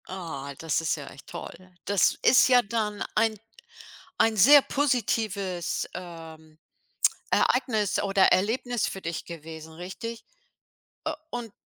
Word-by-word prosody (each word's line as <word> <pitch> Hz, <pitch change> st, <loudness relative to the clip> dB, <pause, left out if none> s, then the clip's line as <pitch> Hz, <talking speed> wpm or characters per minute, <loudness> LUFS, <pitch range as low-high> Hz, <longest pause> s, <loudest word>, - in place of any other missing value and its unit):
Ah, 160 Hz, -7 st, -6 dB
das 165 Hz, 0 st, -1 dB
ist 165 Hz, -, 0 dB
ja 145 Hz, -3 st, -9 dB
echt 140 Hz, -, -13 dB
toll. 185 Hz, +1 st, -10 dB
Das 200 Hz, -2 st, +2 dB
ist 255 Hz, -, +6 dB
ja 250 Hz, -1 st, +6 dB
dann 210 Hz, -1 st, -2 dB
ein 220 Hz, 0 st, +2 dB, 0.8 s
ein 225 Hz, -1 st, +3 dB
sehr 285 Hz, +9 st, +8 dB
positives, 215 Hz, -, -1 dB
ähm, 160 Hz, -3 st, -10 dB, 0.7 s
Ereignis 220 Hz, -6 st, +1 dB
oder 195 Hz, -1 st, +3 dB
Erlebnis 230 Hz, +3 st, +1 dB
für 195 Hz, -, -5 dB
dich 170 Hz, 0 st, -4 dB
gewesen, 160 Hz, -1 st, -9 dB
richtig? 190 Hz, +7 st, -7 dB, 0.8 s
Äh, -, -, -1 dB, 0.2 s
und 240 Hz, -3 st, -5 dB
195 Hz, 125 wpm, -26 LUFS, 165-225 Hz, 0.8 s, sehr